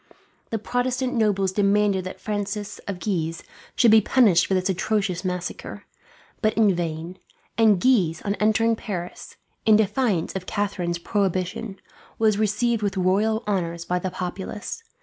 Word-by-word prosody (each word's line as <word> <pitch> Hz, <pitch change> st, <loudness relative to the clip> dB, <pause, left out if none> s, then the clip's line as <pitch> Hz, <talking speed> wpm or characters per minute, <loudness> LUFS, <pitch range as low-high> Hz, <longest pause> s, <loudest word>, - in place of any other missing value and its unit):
The 225 Hz, -, -1 dB
Protestant 250 Hz, +3 st, -1 dB
nobles 205 Hz, -5 st, +1 dB
demanded 200 Hz, -1 st, +2 dB
that 185 Hz, -, -7 dB
Francis 205 Hz, 0 st, -4 dB
of 195 Hz, -3 st, -4 dB
Guise 165 Hz, -5 st, -2 dB, 0.3 s
should 235 Hz, -3 st, +5 dB
be 220 Hz, 0 st, +7 dB
punished 205 Hz, -7 st, +4 dB
for 190 Hz, -, +1 dB
this 185 Hz, 0 st, 0 dB
atrocious 195 Hz, -1 st, -1 dB
massacre, 180 Hz, -1 st, -5 dB, 0.6 s
but 215 Hz, -1 st, +1 dB
in 215 Hz, -3 st, +4 dB
vain; 170 Hz, +1 st, -4 dB, 0.4 s
and 220 Hz, -4 st, +4 dB
Guise, 180 Hz, -10 st, +3 dB
on 200 Hz, -, 0 dB
entering 225 Hz, +2 st, +3 dB
Paris, 180 Hz, -6 st, -6 dB, 0.3 s
in 220 Hz, -, +6 dB
defiance 215 Hz, -4 st, +1 dB
of 190 Hz, 0 st, -5 dB
Catharine's 185 Hz, -4 st, -2 dB
prohibition, 190 Hz, +2 st, -2 dB, 0.4 s
was 215 Hz, -2 st, +2 dB
received 220 Hz, +2 st, +1 dB
with 200 Hz, -2 st, -1 dB
royal 210 Hz, +5 st, +1 dB
honours 170 Hz, -4 st, -2 dB
by 180 Hz, 0 st, 0 dB
the 185 Hz, -, -3 dB
populace. 190 Hz, -, -5 dB
200 Hz, 145 wpm, -24 LUFS, 180-220 Hz, 0.6 s, be